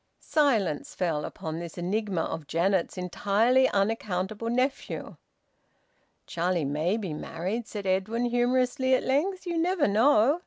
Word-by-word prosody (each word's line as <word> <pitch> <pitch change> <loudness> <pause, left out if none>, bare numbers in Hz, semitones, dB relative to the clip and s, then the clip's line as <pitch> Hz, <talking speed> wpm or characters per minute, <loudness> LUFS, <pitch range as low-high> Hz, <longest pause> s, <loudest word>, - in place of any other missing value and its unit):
Silence 230 - 0
fell 160 -5 -1
upon 160 0 -5
this 170 0 -8
enigma 190 0 -1
of 160 -2 -4
Janet's 180 +3 0
entirely 205 +8 +2
unaccountable 205 +1 -1
nephew. 255 +3 -2 1.1
"Charlie 170 -2 -1
may 155 +8 0
be 190 -8 -4
married," 185 +9 -4
said 205 -2 -6
Edwin 195 +6 0
humorously, 250 +2 +2
at - - -1
length. 365 +9 0
"You 340 -2 -1
never 350 -1 +2
know! 235 +7 +4
210 Hz, 125 wpm, -27 LUFS, 180-255 Hz, 1.1 s, know